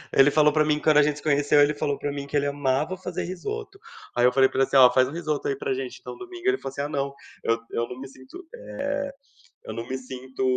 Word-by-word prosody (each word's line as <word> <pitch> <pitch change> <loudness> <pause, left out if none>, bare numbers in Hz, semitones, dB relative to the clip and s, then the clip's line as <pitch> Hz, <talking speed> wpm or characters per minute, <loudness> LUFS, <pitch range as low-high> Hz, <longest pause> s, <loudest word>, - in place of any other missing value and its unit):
Ele 135 +1 +7
falou 150 0 +4
pra 155 - +4
mim 150 0 +2
que, - - -9
quando 155 -1 +5
a - - +8
gente 150 0 0
se - - -11
conheceu, 145 0 +3
ele 145 +1 +4
falou 145 -1 -2
pra 145 - -3
mim 140 0 -5
que 145 - -1
ele 145 - +1
amava 145 +4 0
fazer 180 -1 -4
risoto. 405 - -6 0.4
Aí 120 - +2
eu 125 - +5
falei 130 +1 +5
pra - - -4
ele 135 - +4
assim: - - +2
"Ó, 125 -2 +8
faz 130 0 +4
um - - -7
risoto 155 -3 -2
aí 140 - 0
pra 135 - -2
gente 130 -1 -5
então, - - -9
domingo". 370 0 -8
Ele 390 0 +3
falou - - -6
assim: 140 - -4
"Ah 145 - -3
não, 140 -1 -2 0.3
eu 115 - +2
eu 120 - -1
não 125 +1 -8
me 135 - -7
sinto, 130 - -13
eh, - - -10 1.0
eu - - -6
não 115 0 -6
me 130 - -3
sinto 130 0 -7
145 Hz, 280 wpm, -25 LUFS, 130-155 Hz, 1.0 s, a